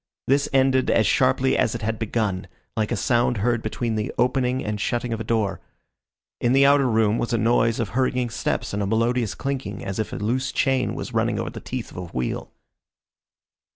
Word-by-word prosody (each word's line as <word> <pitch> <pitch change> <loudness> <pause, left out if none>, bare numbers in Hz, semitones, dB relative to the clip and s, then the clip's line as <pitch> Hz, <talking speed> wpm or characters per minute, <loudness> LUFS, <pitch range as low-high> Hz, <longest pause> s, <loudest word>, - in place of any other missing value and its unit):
This 140 +2 +2
ended 130 -1 +3
as 110 - +3
sharply 130 +2 +3
as 120 -2 +1
it 115 - -5
had 110 0 -2
begun, 105 -4 -1 0.3
like 110 -2 -1
a - - +2
sound 120 -1 +1
heard 120 +3 +1
between 115 +1 -2
the 105 -1 -2
opening 125 +1 +1
and 105 -1 -3
shutting 120 0 -1
of 115 - -3
a - - -3
door. 110 -4 0 0.8
In 120 +1 +2
the 135 +1 +6
outer 140 -2 +5
room 110 -1 +2
was 120 - -2
a - - +3
noise 115 0 +2
of 115 -4 -1
hurrying 125 +1 0
steps - - -2
and 100 - -1
a 100 - 0
melodious 115 +1 +1
clinking 135 -5 -4
as 95 +1 -4
if 110 - -2
a - - -5
loose 120 +6 -1
chain 135 -2 +1
was - - -6
running - - +1
over - - -3
the - - -7
teeth - - -5
of - - -12
a 90 - -4
wheel. 65 -7 -4
120 Hz, 205 wpm, -23 LUFS, 110-130 Hz, 0.8 s, the